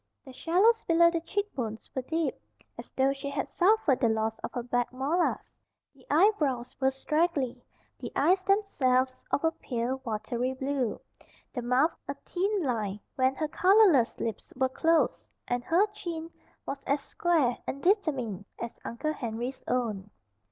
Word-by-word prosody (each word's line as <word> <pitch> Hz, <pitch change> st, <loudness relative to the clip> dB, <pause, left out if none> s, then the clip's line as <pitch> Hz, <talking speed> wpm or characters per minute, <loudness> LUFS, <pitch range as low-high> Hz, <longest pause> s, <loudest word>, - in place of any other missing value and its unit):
The 265 Hz, -, -11 dB
shallows 385 Hz, -, +3 dB
below 335 Hz, 0 st, +5 dB
the 335 Hz, -1 st, -1 dB
cheekbones 280 Hz, -, -3 dB
were 260 Hz, -, -1 dB
deep, 320 Hz, +5 st, -1 dB, 0.4 s
as -, -, -9 dB
though 270 Hz, +1 st, +2 dB
she 275 Hz, 0 st, -6 dB
had 280 Hz, 0 st, -2 dB
suffered 365 Hz, -, +3 dB
the 235 Hz, -, +3 dB
loss 220 Hz, 0 st, 0 dB
of -, -, -4 dB
her 245 Hz, -, -3 dB
back 245 Hz, 0 st, -1 dB
molars. 285 Hz, +8 st, -1 dB, 0.4 s
The 265 Hz, -2 st, -22 dB
eyebrows 295 Hz, -, +2 dB
were 265 Hz, 0 st, +3 dB
straggly; 270 Hz, -2 st, -1 dB, 0.4 s
the -, -, -6 dB
eyes 375 Hz, +2 st, +3 dB
themselves 265 Hz, -11 st, +1 dB
of 285 Hz, -, 0 dB
a 325 Hz, -, +3 dB
pale, 255 Hz, -2 st, -3 dB
watery 235 Hz, +2 st, -2 dB
blue; 265 Hz, -3 st, -2 dB, 0.5 s
the 250 Hz, -, -3 dB
mouth 250 Hz, +7 st, +2 dB
a -, -, -3 dB
thin 390 Hz, +1 st, 0 dB
line 215 Hz, -7 st, -2 dB
when 260 Hz, 0 st, +2 dB
her 310 Hz, +2 st, -1 dB
colorless 365 Hz, -, +4 dB
lips 225 Hz, -4 st, -4 dB
were 260 Hz, 0 st, +1 dB
closed; 325 Hz, +4 st, +1 dB, 0.2 s
and 245 Hz, 0 st, -1 dB
her 350 Hz, +5 st, +4 dB
chin 335 Hz, -5 st, -6 dB, 0.3 s
was 275 Hz, 0 st, -5 dB
as 280 Hz, +1 st, +1 dB
square 310 Hz, -7 st, +1 dB
and 275 Hz, -, -4 dB
determined 275 Hz, -, +1 dB
as 235 Hz, -, -6 dB
Uncle 305 Hz, +7 st, -3 dB
Henry's 240 Hz, 0 st, -5 dB
own. 215 Hz, -6 st, -1 dB
270 Hz, 155 wpm, -29 LUFS, 245-335 Hz, 0.5 s, below